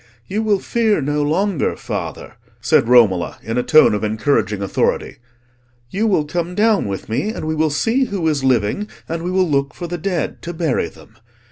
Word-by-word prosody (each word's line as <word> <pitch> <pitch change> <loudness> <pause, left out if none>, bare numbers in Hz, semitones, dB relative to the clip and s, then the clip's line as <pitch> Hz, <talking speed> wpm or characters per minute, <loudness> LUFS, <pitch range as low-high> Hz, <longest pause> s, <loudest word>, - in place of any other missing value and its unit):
"You 205 - -2
will 215 -2 +2
fear 220 0 +1
no 145 +1 -1
longer, 160 +3 0
father," - - -5 0.3
said - - +2
Romola, 110 -8 +4
in 115 +2 -2
a - - +2
tone 155 -2 +5
of 105 - -2
encouraging 110 -1 0
authority; 95 - -1 0.7
"you 215 +4 0
will 185 -8 +2
come 175 +3 -3
down 215 - +2
with 100 -1 -5
me, 115 - -1
and 220 - -5
we 155 - -1
will 155 0 +1
see 225 - +1
who 195 -8 -2
is 145 -4 0
living, 130 - +1 0.2
and 165 0 -3
we 175 - -3
will 185 0 +2
look 140 -3 0
for 175 - -6
the 175 0 -4
dead 175 -2 -2
to 175 - -6
bury 160 -6 0
them. - - -18
155 Hz, 195 wpm, -19 LUFS, 125-195 Hz, 0.7 s, tone